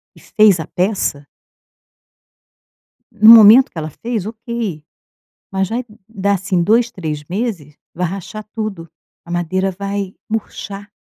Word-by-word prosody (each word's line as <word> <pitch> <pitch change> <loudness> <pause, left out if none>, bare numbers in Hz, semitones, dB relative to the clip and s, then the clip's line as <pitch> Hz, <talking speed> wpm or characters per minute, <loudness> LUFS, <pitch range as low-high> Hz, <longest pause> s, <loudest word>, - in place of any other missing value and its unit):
e - - -17
fez 210 -5 +3
a 160 - -4
peça 180 -6 -1 1.9
no 215 0 +6
momento 230 +4 +9
que - - -10
ela 155 0 -4
fez, 225 - -4
ok! 225 -7 -5 0.7
Mas 190 -1 -1
vai 240 +3 -2 0.2
dar, 200 -2 -1
assim, 185 -1 -1
2, 230 +6 +2
3 155 -5 -5
meses, 175 - -4 0.2
vai 180 +2 -2
rachar 195 +4 -7
tudo, 205 -7 -5 0.4
a 170 - -10
madeira 185 +3 -1
vai 200 0 -4 0.2
murchar. 205 -2 -6
195 Hz, 130 wpm, -17 LUFS, 175-220 Hz, 1.9 s, momento